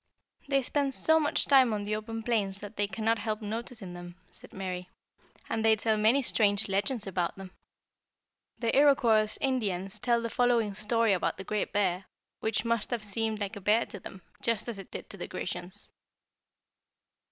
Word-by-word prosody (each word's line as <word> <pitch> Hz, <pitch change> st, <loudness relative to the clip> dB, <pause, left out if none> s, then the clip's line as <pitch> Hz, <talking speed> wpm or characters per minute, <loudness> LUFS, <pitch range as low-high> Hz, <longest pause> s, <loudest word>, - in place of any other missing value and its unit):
"They 275 Hz, -1 st, +2 dB
spend 275 Hz, 0 st, 0 dB
so 320 Hz, 0 st, +4 dB
much 295 Hz, -2 st, +1 dB
time 265 Hz, -4 st, +6 dB
on 205 Hz, -1 st, -2 dB
the 210 Hz, +1 st, -1 dB
open 225 Hz, +1 st, -5 dB
plains 205 Hz, -4 st, 0 dB
that 205 Hz, +1 st, -8 dB
they 205 Hz, 0 st, 0 dB
cannot 220 Hz, +3 st, 0 dB
help 215 Hz, 0 st, -2 dB
noticing 220 Hz, -3 st, -5 dB
them," 175 Hz, 0 st, -9 dB, 0.2 s
said -, -, -11 dB
Mary; 180 Hz, -1 st, -5 dB, 0.6 s
"and 225 Hz, -1 st, -1 dB
they 220 Hz, 0 st, +6 dB
tell 220 Hz, +1 st, +1 dB
many 225 Hz, +6 st, +3 dB
strange 205 Hz, -3 st, +2 dB
legends 205 Hz, +4 st, -1 dB
about 180 Hz, -3 st, -1 dB
them. 195 Hz, -1 st, -10 dB, 1.1 s
The 230 Hz, -1 st, 0 dB
Iroquois 235 Hz, -7 st, +4 dB
Indians 200 Hz, -8 st, -1 dB
tell 240 Hz, -1 st, +2 dB
the 230 Hz, -, -2 dB
following 240 Hz, -4 st, +2 dB
story 215 Hz, +1 st, +2 dB
about 180 Hz, -, 0 dB
the 190 Hz, -, -6 dB
Great 210 Hz, +1 st, -2 dB
Bear, 190 Hz, -2 st, 0 dB, 0.3 s
which 220 Hz, 0 st, -1 dB
must 230 Hz, -2 st, 0 dB
have 235 Hz, -3 st, -2 dB
seemed 220 Hz, +1 st, -1 dB
like 205 Hz, +1 st, -3 dB
a 200 Hz, -, -8 dB
Bear 215 Hz, +4 st, +3 dB
to 205 Hz, -, -9 dB
them, 190 Hz, 0 st, -11 dB, 0.2 s
just 230 Hz, -1 st, 0 dB
as 230 Hz, -4 st, -4 dB
it 195 Hz, -, -10 dB
did -, -, -7 dB
to 200 Hz, -, -8 dB
the 175 Hz, -, -5 dB
Grecians. 180 Hz, +3 st, -6 dB
215 Hz, 180 wpm, -29 LUFS, 195-230 Hz, 1.1 s, time